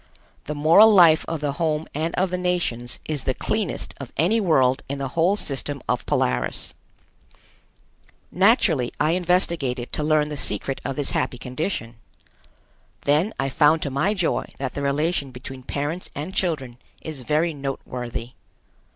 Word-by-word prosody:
The 150 - -4
moral 165 +9 +7
life 170 -5 +6
of 165 -2 -3
the 145 -1 0
home 155 0 -1
and 160 +3 -2
of 185 0 0
the 180 - -1
nations 170 -10 -1
is 150 -4 -3
the 130 - 0
cleanest 215 -5 -2
of 135 -3 -8
any 200 +9 +3
world 135 -7 +3
in 140 - -2
the 135 -1 -3
whole 170 +7 +2
system 140 -5 -2
of - - -1
Polaris. 60 -1 -1 1.6
Naturally 180 - +3
I 155 +2 +3
investigated 170 -8 0
to 150 - -1
learn 150 -1 +2
the 150 - -5
secret 135 0 -2
of 135 - -3
this 145 0 0
happy 125 - -1
condition. 125 - -4 1.0
Then 150 +9 +2
I 135 0 0
found 150 +3 +3
to 140 - -3
my 170 +11 +1
joy 180 -4 0
that 135 -2 -4
the 140 - -4
relation 140 +1 0
between 130 +1 -9
parents 145 +7 -3
and 155 +7 -5
children 135 -11 -2 0.2
is 155 -3 -6
very 155 +6 +1
noteworthy. 125 -4 -5
150 Hz, 155 wpm, -23 LUFS, 135-170 Hz, 1.6 s, moral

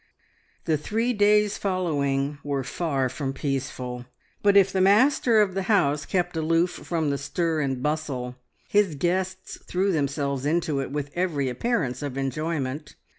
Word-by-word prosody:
The 160 -2 +2
three 225 +10 -1
days 210 -1 +3
following 145 -7 -1
were 140 -2 -2
far 135 -2 -1
from 135 +1 -4
peaceful, 130 -3 -4 0.3
but 200 -1 +5
if 195 -1 +5
the 190 - +2
master 225 +3 +4
of 195 -3 +1
the 195 - -1
house 150 -8 +2
kept 175 -2 -1
aloof 165 +2 +2
from 160 -4 -2
the 140 - -2
stir 165 +2 -1
and 135 -3 -2
bustle, 140 -5 -2 0.3
his 205 -6 +2
guests 185 +4 -2
threw 190 +2 0
themselves 140 -3 -1
into 155 -1 0
it 135 - -3
with 145 0 -4
every 160 -7 0
appearance 130 - -1
of 140 -2 -4
enjoyment. 145 +1 -3
155 Hz, 150 wpm, -25 LUFS, 140-185 Hz, 0.3 s, but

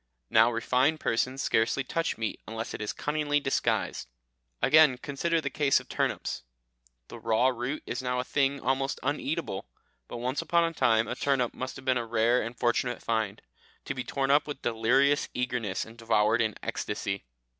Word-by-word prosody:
Now 110 +2 +6
refined 130 +6 +1
persons 130 +3 0
scarcely 115 +4 +1
touch 165 +5 -2
meat 115 -1 -3
unless 115 +1 -5
it - - -6
is 105 - -2
cunningly 150 -1 0
disguised. 135 - -1 0.5
Again, 150 -2 +6
consider 155 +5 -1
the 140 -3 -3
case 140 -1 +3
of - - -14
turnips; - - -1 0.7
the - - -9
raw 115 +3 +3
root 125 +4 -3
is 125 - -3
now 125 0 -1
a - - 0
thing 140 +1 +1
almost 135 +2 -1
uneatable, 145 - -2 0.4
but - - -6
once 125 +3 -2
upon 170 0 +2
a 165 0 0
time 115 -6 +3
a - - -2
turnip 130 -2 0
must 130 0 -5
have 130 - -11
been 130 -1 +3
a 120 - -3
rare 115 +2 +3
and 115 +2 -6
fortunate 120 0 0
find, 110 -3 -1 0.4
to - - -2
be 130 -1 -4
torn 135 +1 -1
up 145 +2 +4
with 145 -2 -6
delirious 130 +6 +2
eagerness 125 -6 -2
and 115 +1 -14
devoured 115 0 +2
in 110 -2 0
ecstasy. 95 0 -3
125 Hz, 175 wpm, -28 LUFS, 115-140 Hz, 0.7 s, Now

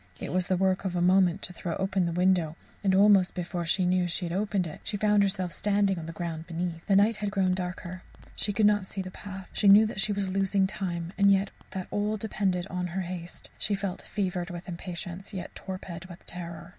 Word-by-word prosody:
It - - -5
was 185 -1 +1
the 185 - +2
work 190 0 +2
of 185 -2 -2
a - - +1
moment 180 0 +4
to 180 - -6
throw 170 -1 -4
open 190 -2 0
the - - -1
window, 175 -2 +2 0.3
and 190 -1 +3
almost 195 -2 +5
before 175 -1 -3
she 185 +2 +3
knew 180 0 +2
she 175 +1 -1
had 170 - -3
opened 200 -1 0
it, 155 - -8
she 205 - -2
found 210 0 +4
herself 190 -3 0
standing 200 -2 +1
on 160 - -7
the - - -4
ground 165 -1 -5
beneath. 170 -1 -3
The 200 - +4
night 210 +3 +4
had 210 -1 -2
grown 190 -2 +2
darker; 180 0 -4 0.3
she 210 - 0
could 210 +1 +2
not 205 -2 +3
see 195 0 -4
the 185 - -7
path; 195 -1 -8
she 205 - +2
knew 205 +2 +9
that 205 -2 -2
she 210 - +1
was 200 -1 0
losing 195 +1 +2
time, 175 -3 -3
and 200 0 +6
yet 195 0 +2 0.2
that 185 -1 -4
all 210 +1 0
depended 195 -4 -1
on 180 -2 -3
her 185 +2 -3
haste; 175 -1 -6
she 205 - +1
felt 195 -1 -3
fevered 185 -3 -2
with 175 +1 -7
impatience, 180 +2 -6
yet 180 - -5
torpid 185 -2 -7
with 175 -1 -12
terror. 170 -1 -7
185 Hz, 230 wpm, -28 LUFS, 175-200 Hz, 0.3 s, knew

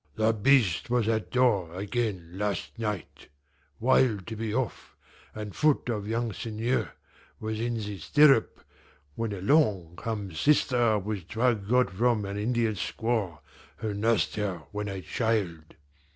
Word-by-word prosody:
"The 110 +1 +2
Beast 110 -4 +3
was 120 -3 +1
at 110 -1 0
door 105 -10 +2
again 100 -4 -2
last 105 +2 -3
night, 105 -7 -4 0.5
wild 115 -5 +3
to 115 - -6
be 110 0 -3
off, 125 +1 -3 0.4
and 105 -2 -6
foot 150 -4 +2
of 105 -3 -2
young 115 0 -1
Seigneur 115 +5 -2 0.5
was 110 0 -3
in 120 +1 -1
the 105 -3 -5
stirrup, 140 - +4 0.5
when 115 +6 -3
along 100 - +1
comes 100 -7 -4
sister 125 -6 +3
with 100 -3 -4
drug 110 -3 0
got 125 -5 +3
from 115 +1 +1
an 100 0 -5
Indian 115 +1 0
squaw 105 -4 -2 0.4
who 110 -2 -3
nursed 110 +2 +1
her 95 -6 -2
when 105 0 -3
a 95 -1 -4
child. 100 -9 -2
110 Hz, 140 wpm, -28 LUFS, 100-120 Hz, 0.5 s, stirrup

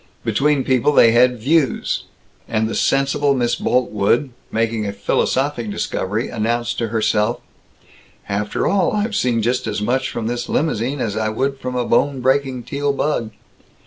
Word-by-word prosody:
Between 145 -1 +2
people 130 +2 +2
they 115 -4 +6
had 125 +1 +4
Views; 140 +1 +1 0.4
and 110 0 0
the 110 - -4
sensible 140 +1 +1
Miss 120 -2 0
Boltwood, 120 +2 +1 0.2
making 115 -1 -1
a 100 - -3
philosophic 130 +2 0
discovery, 105 +2 -2
announced 120 +1 -1
to 115 - -1
herself, 110 +1 0 0.9
"After 105 +1 -2
all, 200 +1 +2
I've 210 +1 -1
seen 120 - +1
just 125 +1 0
as 105 -1 -2
much 125 +5 0
from 115 - -4
this 120 +1 -3
limousine 135 -2 -1
as 105 -2 -2
I 110 0 0
would 135 +5 -2
from 125 -1 -4
a 125 -1 0
bone 135 +4 +1
breaking 130 -1 0
Teal 140 +3 -1
bug. 140 -5 -1
120 Hz, 155 wpm, -20 LUFS, 110-140 Hz, 0.9 s, they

